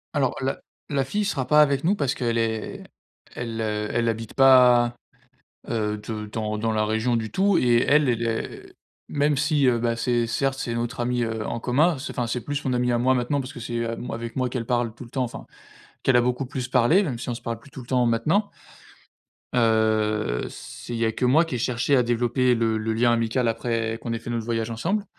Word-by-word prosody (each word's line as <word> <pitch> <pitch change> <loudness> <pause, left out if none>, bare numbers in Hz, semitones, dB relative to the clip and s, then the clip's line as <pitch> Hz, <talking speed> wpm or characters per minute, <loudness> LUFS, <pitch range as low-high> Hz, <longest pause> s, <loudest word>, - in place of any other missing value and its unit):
Alors - - +1
la - - -2 0.3
la 140 -2 +1
fille 205 +8 -1
sera 130 -9 -2
pas 150 +2 +6
avec 140 -1 0
nous 195 +5 +3
parce 140 -6 0
qu'elle 115 -2 -1
est 110 -1 -2 0.5
elle 115 -1 -4
elle 105 +2 -1
habite 115 -1 -4
pas, 125 -3 +6 0.8
heu, 105 -2 -1
de 105 0 -6
dans 105 0 -3
dans 115 +1 0
la 110 0 +1
région 110 +3 0
du 110 -1 -3
tout 195 -1 +3
et 120 -4 +4
elle, 145 -3 +4
elle 120 0 -1
est 115 0 -4 0.4
même 145 0 +1
si, 150 -1 +2
heu, 120 -2 +3
bah, 115 0 0
c'est, 120 0 0
certes 135 +3 -1
c'est 120 -3 -3
notre 120 +2 -3
amie, 120 0 0
heu, 110 -1 -3
en 115 - -3
commun, 145 +6 +2
c'est 130 - -6
enfin, 120 -2 -1
c'est 120 +1 -2
plus 145 0 -3
mon 130 - 0
amie 125 0 +1
à - - +2
moi 130 +2 +3
maintenant 125 +3 0
parce 130 +1 -7
que 120 - -8
c'est 115 +1 -3
à 115 0 -3
moi 120 - -5
avec 115 0 -6
moi 130 -1 0
qu'elle 120 -2 -3
parle 120 -2 0
tout 120 - -10
le 115 - -14
temps 130 -2 -1
enfin, 120 - -7 0.6
qu'elle 130 -3 +3
a - - +5
beaucoup 125 +2 -1
plus 130 -1 -4
parler 135 - +4
même 130 -10 -3
si - - -6
on 120 - -2
se - - -9
parle 115 -1 -4
plus 140 - -17
tout 130 - -9
le 120 - -13
temps 125 -2 +2
maintenant. 150 - +1 1.0
Heu, 110 - +1
c'est 120 - -9
il 115 - -3
y 115 - +2
a 110 - +1
que 125 - -1
moi 155 +7 +4
qui 135 - -4
ai - - -1
cherché 125 +3 +1
à 125 - +5
développer 120 +1 +1
le 115 -1 +1
le 110 +1 -2
lien 120 +1 +3
amical 115 +2 +1
après 115 0 -1
qu'on 115 - -4
ait 115 - -1
fait 120 - -6
notre 115 -2 -2
voyage 115 -1 -2
ensemble 195 - -1
120 Hz, 235 wpm, -24 LUFS, 115-130 Hz, 1.0 s, pas